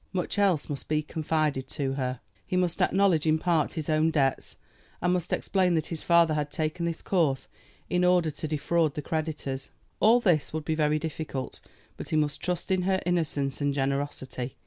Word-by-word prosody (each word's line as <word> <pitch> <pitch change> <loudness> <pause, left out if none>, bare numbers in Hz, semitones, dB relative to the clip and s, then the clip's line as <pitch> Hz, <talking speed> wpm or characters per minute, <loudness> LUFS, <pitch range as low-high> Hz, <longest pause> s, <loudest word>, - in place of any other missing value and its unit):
Much 185 +2 -1
else 190 -7 +2
must 145 -2 -5
be 155 0 +1
confided 155 -3 -1
to 135 -3 -2
her. 130 -2 -3 0.3
He 180 - 0
must 180 -2 0
acknowledge 185 -5 +3
in 155 0 +4
part 165 -2 +1
his 160 -4 -4
own 155 +1 +3
debts, 140 -4 0 0.4
and 180 +1 +1
must 180 -1 -2
explain 185 -3 +1
that 160 - 0
his 160 - -4
father 170 -2 +4
had 150 -1 -1
taken 160 +2 -2
this 165 -1 -4
course 145 -8 +1 0.4
in 180 0 +1
order 180 -3 +3
to 155 - -5
defraud 155 +1 +1
the 150 - -4
creditors. 150 -4 -3 0.3
All 225 +3 +6
this 175 -10 +2
would 155 -1 -3
be 160 - 0
very 155 -1 +2
difficult; 155 -4 -5 0.4
but - - -6
he - - 0
must 150 -1 0
trust 180 +1 -2
in 185 -1 +2
her 190 +1 +1
innocence 150 -6 0
and 145 -1 +1
generosity. 135 -2 -3
155 Hz, 190 wpm, -27 LUFS, 145-175 Hz, 0.4 s, All